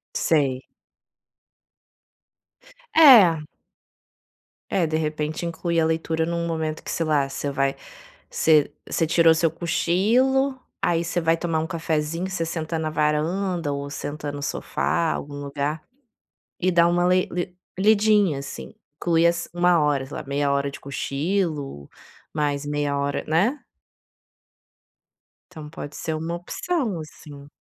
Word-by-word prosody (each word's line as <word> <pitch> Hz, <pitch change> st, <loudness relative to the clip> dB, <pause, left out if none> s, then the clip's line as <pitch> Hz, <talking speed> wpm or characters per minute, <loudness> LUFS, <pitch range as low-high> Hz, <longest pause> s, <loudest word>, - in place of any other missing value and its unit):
Sei. 135 Hz, -5 st, +1 dB, 2.3 s
É. 205 Hz, -, +7 dB, 1.2 s
É, 175 Hz, -4 st, +1 dB
de 155 Hz, 0 st, -1 dB
repente 155 Hz, +1 st, -2 dB
inclui 170 Hz, 0 st, -1 dB
a 160 Hz, -, +3 dB
leitura 160 Hz, 0 st, 0 dB
em 170 Hz, -, -3 dB
um 170 Hz, 0 st, -2 dB
momento 160 Hz, -2 st, -3 dB
que -, -, -8 dB
sei 165 Hz, -, -1 dB
lá 145 Hz, -3 st, +1 dB
você 140 Hz, +1 st, -3 dB
vai 135 Hz, 0 st, 0 dB, 0.6 s
você 155 Hz, -3 st, +3 dB, 0.2 s
você 165 Hz, -, 0 dB
tirou 165 Hz, +1 st, +5 dB
o -, -, +2 dB
seu 165 Hz, 0 st, +2 dB
cochilo, 230 Hz, -, +1 dB, 0.2 s
aí 170 Hz, -1 st, +2 dB
você 175 Hz, +1 st, -2 dB
vai 165 Hz, 0 st, +3 dB
tomar 165 Hz, -1 st, -1 dB
um 160 Hz, -, -2 dB
cafezinho 165 Hz, +1 st, -2 dB
você 185 Hz, -3 st, -2 dB
senta 165 Hz, 0 st, -3 dB
na 155 Hz, -1 st, -2 dB
varanda 155 Hz, +2 st, 0 dB
ou 140 Hz, 0 st, -4 dB
senta 145 Hz, +1 st, -5 dB
no 145 Hz, 0 st, -7 dB
sofá 170 Hz, +3 st, -1 dB
algum 145 Hz, 0 st, -5 dB
lugar, 145 Hz, +2 st, -3 dB, 0.8 s
e 185 Hz, -, +2 dB
dá 170 Hz, -2 st, +4 dB
uma 175 Hz, 0 st, +2 dB
lei 185 Hz, +1 st, +2 dB
li 180 Hz, +1 st, -4 dB, 0.2 s
lidinha 205 Hz, -6 st, +4 dB
assim, 140 Hz, -, -8 dB, 0.2 s
inclui 165 Hz, -1 st, +2 dB
as 170 Hz, 0 st, +1 dB
1 175 Hz, 0 st, +3 dB
hora 145 Hz, -3 st, +1 dB
sei 135 Hz, -, -8 dB
lá, -, -, -6 dB
meia 140 Hz, 0 st, 0 dB
hora 140 Hz, 0 st, 0 dB
de 140 Hz, -, -10 dB
cochilo, 140 Hz, -, -2 dB, 0.4 s
mais 145 Hz, -2 st, -1 dB
meia 145 Hz, -1 st, -1 dB
hora, 140 Hz, 0 st, -1 dB
né. 200 Hz, -, +1 dB, 1.9 s
Então 155 Hz, -2 st, -9 dB
pode 150 Hz, -2 st, -8 dB
ser 160 Hz, -, -3 dB
uma 165 Hz, +2 st, -3 dB
opção 220 Hz, -, -2 dB
assim. 145 Hz, -2 st, -11 dB
160 Hz, 140 wpm, -24 LUFS, 145-175 Hz, 2.3 s, É